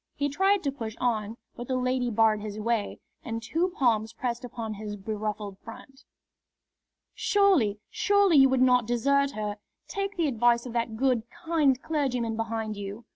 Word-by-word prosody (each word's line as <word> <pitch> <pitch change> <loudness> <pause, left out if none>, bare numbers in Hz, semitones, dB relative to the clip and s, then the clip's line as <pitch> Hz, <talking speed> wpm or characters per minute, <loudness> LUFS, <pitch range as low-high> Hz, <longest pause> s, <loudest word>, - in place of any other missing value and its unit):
He 285 0 -1
tried 385 +6 +2
to 280 - 0
push 225 -5 -6
on, 225 -3 -1 0.2
but 240 - -7
the 260 - -1
lady 255 -1 0
barred 220 -1 +3
his 210 0 -6
way 225 -1 -1 0.3
and 225 -1 -4
two 335 +9 0
palms 225 -4 +1
pressed 240 +1 -3
upon 230 -3 -5
his 210 0 -6
beruffled 210 -1 -4
front. 270 +4 -13 1.1
"Surely, 370 - +3
surely 405 -5 +3
you 270 -1 +7
would 260 -1 +3
not 250 -3 +4
desert 280 +4 +2
her! 210 -1 -4 0.3
Take 395 0 -4
the 330 -3 +2
advice 240 -1 +2
of 245 - -7
that 230 -2 -2
good, 255 -2 +2
kind 320 -6 +1
clergyman 250 -7 -1
behind 225 -1 -3
you!" 205 +3 -7
240 Hz, 165 wpm, -27 LUFS, 220-280 Hz, 1.1 s, you